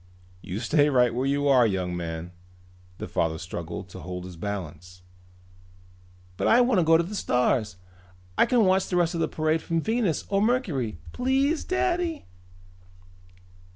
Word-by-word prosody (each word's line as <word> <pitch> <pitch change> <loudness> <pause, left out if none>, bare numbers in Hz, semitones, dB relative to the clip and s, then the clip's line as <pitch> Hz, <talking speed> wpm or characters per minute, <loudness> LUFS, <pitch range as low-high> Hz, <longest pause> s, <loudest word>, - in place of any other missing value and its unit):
"You 95 +2 -5
stay 145 +4 +3
right 125 -4 +3
where 130 +3 -1
you 145 +1 +1
are, 130 -4 +5
young 90 -3 -2
man," 85 0 -5 0.7
the - - -6
father 80 -1 -1
struggled 85 +2 -6
to 95 - -10
hold 90 +1 -6
his 90 -1 -9
balance. 90 -1 -7 1.3
"But - - 0
I 235 - +6
wanna 240 -7 +3
go 160 0 +5
to 170 - +1
the 185 +5 -7
stars. 125 - 0 0.6
I - - +4
can 240 -4 +3
watch 190 0 +2
the 180 - -2
rest 175 -1 +2
of 165 - -2
the - - +1
parade 155 +1 0
from 165 0 -1
Venus 220 -2 0
or 195 0 +1
Mercury! 175 - 0
Please, 270 +5 +1
Daddy!" 355 -3 -1
140 Hz, 155 wpm, -26 LUFS, -, 1.3 s, I